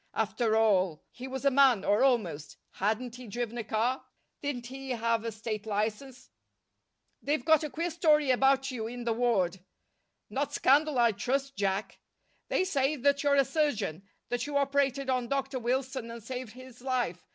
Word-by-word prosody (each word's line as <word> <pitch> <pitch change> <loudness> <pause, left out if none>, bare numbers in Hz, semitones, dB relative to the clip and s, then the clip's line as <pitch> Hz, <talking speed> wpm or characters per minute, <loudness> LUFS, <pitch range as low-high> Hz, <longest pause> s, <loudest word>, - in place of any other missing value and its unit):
After 220 +1 +1
all, 190 -7 +2
he 255 +1 -8
was 265 +1 -5
a 275 - +5
man, 260 -6 +4
or 205 +5 +3
almost. 175 - 0
Hadn't 225 +5 -2
he 250 -1 -10
driven 235 +2 -4
a - - -2
car? 225 +4 -1 0.4
Didn't 275 -4 -3
he 265 +2 -8
have 230 -2 0
a 230 - -3
state 215 0 -5
license? 220 +5 -3 0.9
"They've 290 -2 -1
got 315 -1 +5
a 305 - -3
queer 335 +4 -3
story 305 -4 +3
about 270 +1 +3
you 225 -3 -4
here 240 - -7
in 245 - -5
the 235 -1 0
ward." 210 -7 +1 0.7
"Not 285 +2 -2
scandal, 290 +1 +3
I 235 -1 +5
trust, 270 +6 -2
Jack!" 195 -1 -2 0.5
"They - - +1
say 290 -5 +1
that 280 +1 +2
you're 285 -1 +3
a 275 -1 +4
surgeon; 285 - -1 0.3
that 245 +2 -2
you 290 -1 -1
operated 275 -1 +1
on 255 -2 0
Dr. 270 0 -2
Wilson 255 0 -2
and 230 -1 -8
saved 250 -1 -6
his 255 -1 -13
life. 245 -10 -2
250 Hz, 175 wpm, -29 LUFS, 225-275 Hz, 0.9 s, a